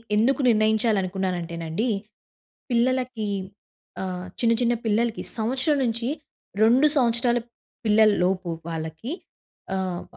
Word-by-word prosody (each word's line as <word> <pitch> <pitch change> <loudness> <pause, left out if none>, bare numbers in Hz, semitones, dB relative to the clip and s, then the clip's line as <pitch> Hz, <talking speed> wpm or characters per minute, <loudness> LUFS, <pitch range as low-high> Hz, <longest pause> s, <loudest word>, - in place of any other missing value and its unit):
ఎందుకు 250 +7 +3
నిర్ణయించాలనుకున్నానంటేనండి, 195 -4 0 0.8
పిల్లలకి 245 -2 +1 0.8
ఆహ్, 185 -1 -4
చిన్న, 230 -1 +4
చిన్న 240 0 +3
పిల్లలకి 225 +1 0
సంవత్సరం 260 +6 +1
నుంచి 235 +1 -1 0.5
2 250 +7 +6
సంవత్సరాల 240 -1 +2 0.5
పిల్లల‌లోపు 200 -4 +3 0.2
వాళ్ళకి 160 - -5 0.6
ఆహ్, 185 -2 -2
220 Hz, 85 wpm, -24 LUFS, 185-240 Hz, 0.8 s, 2